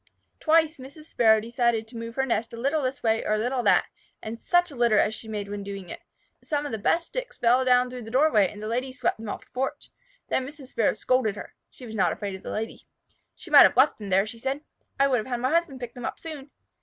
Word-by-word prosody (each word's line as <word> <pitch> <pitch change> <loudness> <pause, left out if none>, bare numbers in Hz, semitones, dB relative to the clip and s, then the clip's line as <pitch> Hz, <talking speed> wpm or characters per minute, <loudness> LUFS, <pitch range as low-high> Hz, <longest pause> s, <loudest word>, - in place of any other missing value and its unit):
Twice 315 -1 +3
Mrs. 280 +4 -11
Sparrow 220 -7 +4
decided 235 0 0
to 235 - -13
move 230 0 -6
her 265 - +1
nest 230 -3 -1
a - - -7
little 280 +6 0
this 260 +1 -3
way 225 -1 +2
or 215 - +1
a - - 0
little 245 +4 -1
that, - - +4 0.3
and 225 +1 -7
such 350 -1 +2
a - - -10
litter 235 -3 +3
as 215 - +3
she 220 - -7
made 210 -2 -4
when 205 0 -5
doing 195 -2 -7
it! - - -8 0.4
Some 295 -1 -2
of 290 - -4
the 220 - -3
best 330 +11 +1
sticks - - -5
fell 245 +2 +3
down 250 -1 +3
through 250 -1 -7
the 225 - -9
doorway, 245 -6 +4
and 210 +1 -10
the - - -4
Lady 250 +4 -2
swept 250 -2 -1
them 220 -1 -6
off - - -6
the - - -36
porch. 265 +1 -4 0.4
Then 260 - -1
Mrs. 285 -2 -12
Sparrow 230 - +1
scolded 255 -5 +1
her. - - -9 0.2
She 255 - -13
was 220 - -8
not 205 - +2
afraid 200 -2 -4
of 190 - -9
a - - -6
Lady. 220 +1 -5 0.5
"She 345 - -12
might 290 - +10
have - - +6
left 265 0 +4
them 205 -2 -7
there," 195 +1 +3
she 230 +2 -9
said. 270 +4 -2 0.4
"I 275 - +5
would 260 -2 +2
have 215 - -6
had 245 -2 -2
my 255 +3 0
husband 335 -6 0
pick 240 -1 -7
them 245 -2 -7
up - - -4
soon. 300 -4 -8
245 Hz, 265 wpm, -26 LUFS, 220-270 Hz, 0.5 s, might